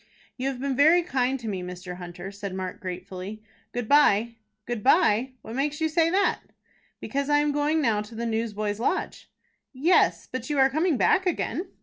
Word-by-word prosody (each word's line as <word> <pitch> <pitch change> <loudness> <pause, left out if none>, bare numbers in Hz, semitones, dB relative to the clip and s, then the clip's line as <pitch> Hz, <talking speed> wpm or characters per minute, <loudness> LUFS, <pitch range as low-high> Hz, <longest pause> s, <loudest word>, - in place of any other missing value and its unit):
"You 260 +1 -3
have 270 -2 -3
been 275 0 -1
very 320 +6 +5
kind 265 -4 0
to 235 - -7
me, 195 -3 -3
Mr. 180 0 -7
Hunter," 175 +1 -8
said 200 -2 -6
Mark, 185 -1 -5
gratefully. 185 +3 -7 0.3
"Good 245 -2 -4
by." 235 -5 +4 0.3
"Good 240 -3 -3
by? 260 - +3
What 220 - -8
makes 290 +3 -1
you 320 - +1
say 330 +1 +2
that?" 390 +3 +2 0.6
"Because 280 +1 -3
I 290 - +4
am 295 0 +2
going 295 +2 +1
now 215 -5 +2
to 215 +2 -10
the 235 +1 -3
Newsboys' 215 -2 -2
Lodge." 235 - -2 0.4
"Yes, 310 +8 +3
but 255 0 -5
you 295 - -1
are 265 0 +4
coming 315 +1 +1
back 375 +8 +3
again." 355 +1 -2
250 Hz, 190 wpm, -26 LUFS, 205-295 Hz, 0.6 s, very